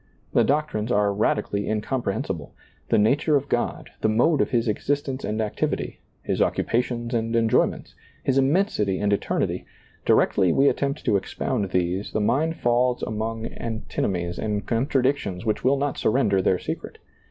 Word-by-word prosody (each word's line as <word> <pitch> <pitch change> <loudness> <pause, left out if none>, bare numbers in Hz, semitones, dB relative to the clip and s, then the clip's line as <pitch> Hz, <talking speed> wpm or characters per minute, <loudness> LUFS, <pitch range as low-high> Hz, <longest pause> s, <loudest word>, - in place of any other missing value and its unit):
The - - +5
doctrines 135 -6 0
are 105 -3 +2
radically 100 0 0
incomprehensi 110 0 -1
ble. - - -11 0.3
The - - +4
nature 140 +8 +3
of 140 0 +1
God, 120 - -2
the 110 - +2
mode 130 +8 +3
of - - +1
His 120 -1 +1
exist 145 +7 -1
ence 135 0 -4
and 105 +1 -2
activity. 110 -2 -2 0.2
His - - -1
occupations 120 0 0
and 115 0 0
enjoyments. 115 -1 +1 0.3
His 135 0 +2
immensity 135 - +1
and 105 +1 +1
eternity, 100 - -1 0.4
directly 95 -4 +3
we 135 +8 +4
attempt 140 +1 -2
to 100 - +3
expound 100 +2 -2
these, 90 +2 -1
the - - +1
mind 135 +10 +1
falls 120 0 +1
among 110 +1 -3
antino 115 -1 -3
mies 85 -2 -3
and 105 -2 -2
contradictions 125 -5 0
which 110 - -1
will 135 +2 +3
not 140 0 -2
surrender 105 -5 +2
their 95 - +2
secret. - - -6
115 Hz, 160 wpm, -24 LUFS, 105-135 Hz, 0.4 s, The